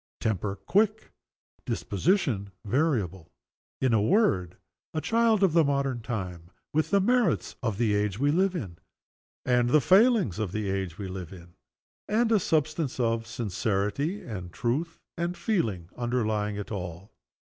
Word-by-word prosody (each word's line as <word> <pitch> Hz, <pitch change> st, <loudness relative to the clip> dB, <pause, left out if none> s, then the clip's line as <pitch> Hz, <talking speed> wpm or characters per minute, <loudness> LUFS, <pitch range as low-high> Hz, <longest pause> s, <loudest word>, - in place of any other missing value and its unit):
Temper, 105 Hz, -2 st, -1 dB
quick. 215 Hz, -, +1 dB, 0.5 s
Disposition, 115 Hz, -, 0 dB, 0.2 s
variable. 105 Hz, -, 0 dB, 0.5 s
In 130 Hz, -3 st, +2 dB
a 110 Hz, -, +4 dB
word, 110 Hz, -, +2 dB, 0.4 s
a -, -, +1 dB
child 225 Hz, +2 st, +2 dB
of 185 Hz, -5 st, +4 dB
the 165 Hz, -1 st, +5 dB
modern 140 Hz, -3 st, 0 dB
time 90 Hz, -8 st, -5 dB, 0.2 s
with 155 Hz, +1 st, +1 dB
the 200 Hz, -, +4 dB
merits 235 Hz, -2 st, +1 dB
of 115 Hz, -6 st, -1 dB
the 110 Hz, -2 st, +2 dB
age 105 Hz, -1 st, 0 dB
we 140 Hz, +4 st, +2 dB
live 190 Hz, +3 st, +2 dB
in, 95 Hz, -, -5 dB, 0.7 s
and 125 Hz, -1 st, +3 dB
the 150 Hz, -, +5 dB
failings 195 Hz, -, +4 dB
of 100 Hz, -4 st, -2 dB
the 105 Hz, -3 st, -1 dB
age 95 Hz, -3 st, -3 dB
we 100 Hz, -2 st, -5 dB
live 95 Hz, -3 st, -6 dB
in 85 Hz, -2 st, -13 dB, 0.5 s
and 225 Hz, +2 st, +2 dB
a 220 Hz, -, +5 dB
substance 155 Hz, -4 st, 0 dB
of 115 Hz, -1 st, 0 dB
sincerity 110 Hz, -, -1 dB
and 95 Hz, -7 st, -6 dB
truth 145 Hz, -, -2 dB, 0.2 s
and 175 Hz, +1 st, -2 dB
feeling 110 Hz, -, -1 dB
underlying 110 Hz, -4 st, -1 dB
it 105 Hz, +1 st, -6 dB
all. 90 Hz, -1 st, -6 dB
120 Hz, 145 wpm, -27 LUFS, -, 0.7 s, the